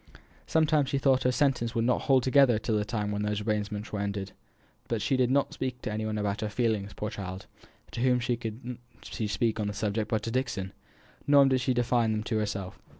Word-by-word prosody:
Sometimes 155 -3 +2
she 140 - 0
thought 135 -1 +3
her 125 - +2
senses 125 -3 +1
would 115 0 +1
not 125 - +2
hold 130 -2 +3
together 130 -3 +5
till 110 +1 -1
the 105 - +1
time 105 -1 -2
when 105 0 -2
all 105 - 0
these 105 0 -1
arrangements 105 0 -2
were 105 - -1
ended. 100 -1 -3 0.6
But 115 - -1
she 120 +6 +1
did 125 -1 +2
not 140 +2 +1
speak 130 -1 -3
to - - -3
any 110 +1 -2
one 110 0 -2
about 105 0 -1
her 105 - -1
feelings, 105 -3 -1
poor 105 0 -4
child; 95 -3 -6 0.5
to - - -4
whom 125 -1 +3
could 120 0 -4 0.2
she 110 - -4
speak 115 +2 0
on 105 - 0
the 105 - -3
subject 105 +1 -2
but 110 -2 0
to 115 - -3
Dixon? 115 -7 -2 0.5
Nor 140 -1 +7
did 130 -1 +2
she 130 0 +1
define 120 -2 +2
them 105 0 -2
to 110 -1 -1
herself. 100 -3 -4
110 Hz, 225 wpm, -28 LUFS, 105-125 Hz, 0.6 s, Nor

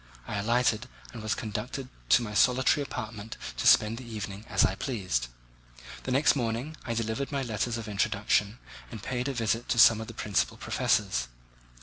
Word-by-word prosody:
I 105 - -3
alighted 120 +2 +1 0.3
and 115 - -7
was 110 +1 -1
conducted 115 +5 -4 0.2
to 90 - +6
my 105 -2 -5
solitary 130 +6 +4
apartment 115 -5 -6 0.2
to - - +1
spend 110 +2 +5
the - - -8
evening 105 -3 -6
as 100 -3 +4
I 95 - +1
pleased. 95 - -2 0.8
The 130 - -2
next 140 +4 +4
morning 125 +4 -2
I 115 - -3
delivered 115 +5 -2
my 140 -2 -1
letters 115 0 -2
of 115 -2 -6
introduction 105 +1 +1 0.3
and 110 -5 -9
paid 125 0 -2
a 140 - -1
visit 115 0 -1
to - - +1
some 110 -1 +7
of 110 - -7
the 115 - -9
principal 100 - 0
professors. - - 0
115 Hz, 180 wpm, -28 LUFS, 105-125 Hz, 0.8 s, some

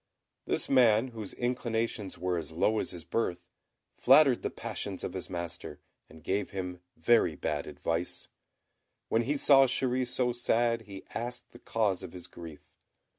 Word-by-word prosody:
This - - 0
man, 120 -2 +5
whose 110 -5 -7
inclinations 115 -4 -2
were 90 0 -1
as 85 -1 -4
low 105 +7 +2
as - - -2
his 85 -2 -6
birth, 90 -2 -2 0.5
flattered 135 -1 +6
the - - -1
passions - - -5
of - - -4
his - - -5
master, 85 -2 -6 0.3
and 80 0 -15
gave 100 +2 -1
him 90 -2 -5 0.2
very 85 -2 +3
bad 75 0 -2
advice. 85 +2 -3 0.8
When 115 - +3
he 140 +5 0
saw 135 -1 +6
Chéri 130 0 +1
so 125 0 +1
sad, 120 -1 +1
he 100 -1 -9
asked 120 +1 -5
the 120 - -14
cause 105 -7 0
of 95 -2 -8
his 90 -2 -8
grief. 85 -4 -11
110 Hz, 160 wpm, -30 LUFS, 90-120 Hz, 0.8 s, flattered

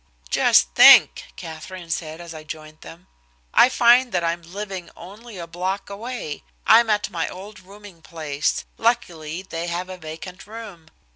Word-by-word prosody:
"Just - - +4
think!" - - +7
Katherine 165 - -9
said 160 0 -4
as 170 -1 -9
I 155 -1 -9
joined 155 0 -10
them, 175 +3 -13 0.5
"I 250 - +6
find 245 0 +4
that 175 -1 0
I'm 170 +1 -1
living 185 0 -7
only 210 +4 -12
a 170 - -6
block 185 +4 -4
away. 220 -6 -6 0.2
I'm 235 -1 +6
at 210 -1 0
my 165 -2 -2
old 200 +2 -10
rooming 195 -2 -15
place 150 -3 -3
luckily 180 -8 -1
they 170 -2 -5
had 180 +2 -4
a 185 - -9
vacant 165 +4 -9
room. 210 -7 -10
180 Hz, 155 wpm, -22 LUFS, 165-205 Hz, 0.5 s, think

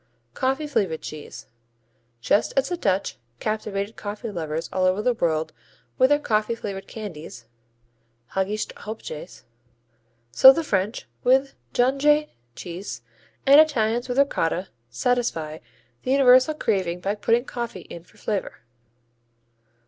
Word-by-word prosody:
Coffee 270 - 0
flavored 205 - -1
cheese 155 -1 -8 0.8
Just 205 - +2
as 270 - +2
the 355 - -1
Dutch 195 - -1 0.2
captivated 215 -1 -3
coffee 210 +2 -6
lovers 160 -3 -3
all 185 -1 +1
over 185 +2 +2
the 250 - +3
world 160 -7 -1 0.5
with 260 0 +6
their 290 - +5
coffee 220 -5 0
flavored 195 -3 -6
candies, 165 - -8 0.9
Haagische 200 +3 -2
Hopjes, 210 -8 -8 0.9
so 265 - +9
the 330 +4 -1
French 205 -4 -1 0.2
with 265 +2 +3 0.2
Jonchée 290 +4 +3 0.3
cheese 175 -8 -7 0.4
and 280 +2 +9
Italians 240 -5 +1
with 245 - -2
Ricotta 185 -9 +1 0.2
satisfy 160 - -1 0.4
the - - -5
universal 260 +2 +6
craving 190 - -1
by 195 +3 -1
putting 230 +4 +1
coffee 235 -8 -5
in 170 - -10
for 210 - -24
flavor. 205 -1 -3
215 Hz, 125 wpm, -24 LUFS, 185-255 Hz, 0.9 s, so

